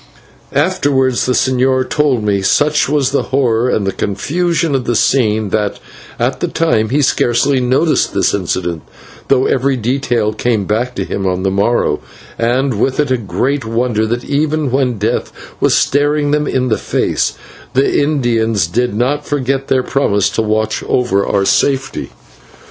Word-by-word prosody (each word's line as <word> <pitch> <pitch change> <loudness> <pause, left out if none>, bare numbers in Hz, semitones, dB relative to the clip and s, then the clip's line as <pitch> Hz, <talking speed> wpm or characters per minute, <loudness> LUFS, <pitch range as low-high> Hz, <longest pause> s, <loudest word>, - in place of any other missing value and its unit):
Afterwards 140 -6 +1
the 125 - +2
señor 130 0 +1
told 140 -7 +1
me, 100 -2 +1
such 150 +10 +2
was 140 -2 +1
the 140 - +1
horror 125 -3 +1
and 100 -5 -1
confusion 160 - -1
of 130 -2 -1
the 120 - 0
scene, 110 -4 +1
that, 105 0 -1 0.4
at 130 +2 -1
the 175 - -1
time, 160 -11 0
he 145 +4 +1
scarcely 130 +2 +2
noticed 135 +6 +1
this - - +1
incident, 90 -3 -2 0.5
though 130 -1 +3
every 135 0 +1
detail 120 -2 0
came 110 -2 -1
back 120 +5 -1
to - - -2
him 95 -1 -3
on 90 0 -1
the 95 - +1
morrow, 100 +5 +1 0.4
and 120 0 0
with 135 +1 0
it 145 -3 +1
a - - +4
great 130 +4 -2
wonder 115 -1 0
that 120 +2 -3
even 150 -1 0
when 130 -3 0
death 110 +4 -1 0.3
was - - +3
staring 145 +1 +1
them 150 0 +1
in 130 -1 0
the 110 - 0
face, - - -1 0.4
the 135 +2 +2
Indians 115 - +1
did 120 +7 -1
not 135 +6 0
forget 135 -1 -1
their 130 -1 +1
promise 105 -8 +1
to - - 0
watch 110 0 -1
over 115 -6 +1
our 100 -1 0
safety. 135 +4 0
125 Hz, 160 wpm, -15 LUFS, 110-140 Hz, 0.5 s, a